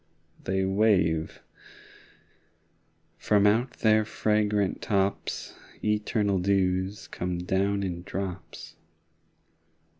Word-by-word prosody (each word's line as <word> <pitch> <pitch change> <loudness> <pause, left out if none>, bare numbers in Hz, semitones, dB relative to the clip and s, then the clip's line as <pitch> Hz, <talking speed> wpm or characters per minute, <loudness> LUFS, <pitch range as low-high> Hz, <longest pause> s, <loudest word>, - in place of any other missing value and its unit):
They 95 0 0
wave: 95 -6 +1 1.8
from 105 -1 +3
out 115 +5 +2
their 110 -1 +4
fragrant 105 -2 0
tops 100 -1 -1 0.3
Eternal 105 -2 +1
dews 95 +1 0
come 90 0 -3
down 100 +2 0
in 90 -2 -3
drops. 90 -3 -7
100 Hz, 80 wpm, -27 LUFS, 95-105 Hz, 1.8 s, their